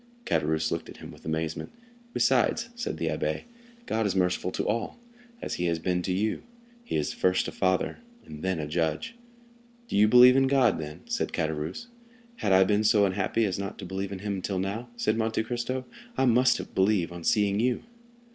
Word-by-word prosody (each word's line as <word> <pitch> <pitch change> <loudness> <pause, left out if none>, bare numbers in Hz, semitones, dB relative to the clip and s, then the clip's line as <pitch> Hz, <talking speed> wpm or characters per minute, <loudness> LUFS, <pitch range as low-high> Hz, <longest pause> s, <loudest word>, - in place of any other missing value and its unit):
Caderousse 80 - 0
looked 85 -1 -3
at - - -10
him - - -10
with - - -16
amazement. 80 0 -3 0.4
"Besides," 235 -1 +2
said 240 +1 -4
the - - -2
abbé, - - -2 0.4
"God 110 -1 0
is 95 - -1
merciful 90 -1 +1
to - - -2
all, 115 - -2 0.5
as - - -3
he - - +1
has 85 -1 +1
been 90 +2 -1
to 90 - -2
you; 105 +4 0 0.4
he - - -4
is 75 -1 0
first 90 0 +1
a - - -4
father, 95 -1 0 0.3
then 85 +4 -3
a 75 - -2
judge." 80 - -1 0.7
"Do - - -4
you 105 +1 +6
then - - +1
believe 125 +2 +8
in 135 0 +4
God?" 120 - +1
said - - -2
Caderousse. 80 - -2 0.5
"Had 105 - 0
I 95 0 +7
been 105 +2 +2
so 105 -2 +5
unhappy 100 +4 0
as 95 -2 -2
not 100 -1 -5
to - - -7
believe 95 +2 -4
in 100 - -4
him 100 -1 -1
until 95 +1 -3
now," 100 +6 -3
said 115 -1 0
Monte 110 0 0
Cristo, 125 +2 -3 0.3
"I 135 - +3
must 125 +1 +3
believe 95 -3 +2
on 85 -1 -8
seeing 100 +1 +2
you." 125 +2 +1
100 Hz, 195 wpm, -27 LUFS, 90-115 Hz, 0.7 s, believe